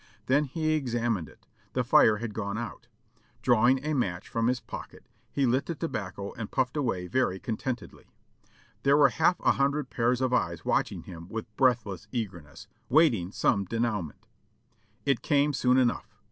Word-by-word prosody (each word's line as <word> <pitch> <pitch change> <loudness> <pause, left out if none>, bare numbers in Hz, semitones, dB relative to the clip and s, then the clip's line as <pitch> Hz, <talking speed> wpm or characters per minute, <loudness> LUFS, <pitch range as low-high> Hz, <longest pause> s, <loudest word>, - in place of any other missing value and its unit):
Then 140 +3 +3
he 155 +3 -1
examined 120 - -1
it; - - -21 0.3
the 125 - +1
fire 110 -3 +5
had 115 -1 -5
gone 100 -1 -3
out. 120 +1 -6 0.6
Drawing 125 +3 +4
a 155 - 0
match 95 -10 -1
from 115 0 0
his 125 0 +1
pocket - - -9 0.3
he 140 - +1
lit 130 +3 +1
the 170 - -3
tobacco 100 - -4
and 110 -2 -6
puffed 130 0 0
away 120 -11 -1
very 95 -3 0
contentedly. 120 +3 -5 0.7
There 140 +1 +4
were 150 - +6
half 170 +3 +2
a - - +4
hundred 140 -1 0
pairs 120 +1 +1
of 130 -1 0
eyes 85 -7 0
w^atching - - 0
him 85 -1 -10
with 110 -1 -6
breathless 120 -8 +1
eagerness, 95 - -6 0.2
waiting 120 - +3
some 100 -1 +1
denouement. 105 -7 -2 0.8
It 140 -4 +2
came 145 -1 +2
soon 125 -1 +3
enough! 125 -2 0
120 Hz, 160 wpm, -28 LUFS, 105-135 Hz, 0.8 s, were